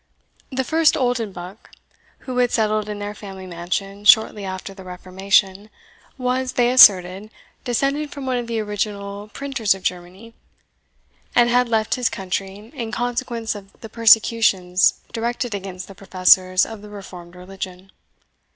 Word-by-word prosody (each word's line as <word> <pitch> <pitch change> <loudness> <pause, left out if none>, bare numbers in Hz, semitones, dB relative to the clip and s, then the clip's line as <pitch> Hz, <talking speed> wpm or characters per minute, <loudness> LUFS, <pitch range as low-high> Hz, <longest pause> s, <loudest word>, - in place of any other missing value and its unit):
The 265 0 -1
first 320 +4 +3
Oldenbuck, 220 -6 -3 0.5
who 255 -1 -4
had 245 -1 +3
settled 215 -2 0
in 210 - -4
their 205 0 -5
family 195 -2 -10
mansion 185 +3 -5
shortly 215 -1 +5
after 190 +1 -6
the 190 -1 -12
Reformation, 190 +2 0 0.5
was, 255 0 -1
they 245 0 +2
asserted, 195 -4 +6 0.4
descended 275 +5 -1
from 280 -2 -8
one 255 -1 -1
of 240 -1 -4
the 230 -1 -2
original 205 -1 -4
printers 235 -4 -1
of 190 - -13
Germany, 180 +6 -5 1.0
and 240 0 +4
had 245 0 +2
left 220 -2 +1
his 250 -2 0
country 195 +3 -5
in 235 -6 -5
consequence 240 -1 -3
of 200 -2 -13
the 225 - -9
persecutions 220 -5 +4 0.2
directed 235 0 -3
against 190 -2 -6
the 195 - -11
professors 185 -1 +3
of 220 -2 -9
the 210 - -12
Reformed 180 -4 -11
religion. 185 0 -9
210 Hz, 140 wpm, -21 LUFS, 190-240 Hz, 1.0 s, asserted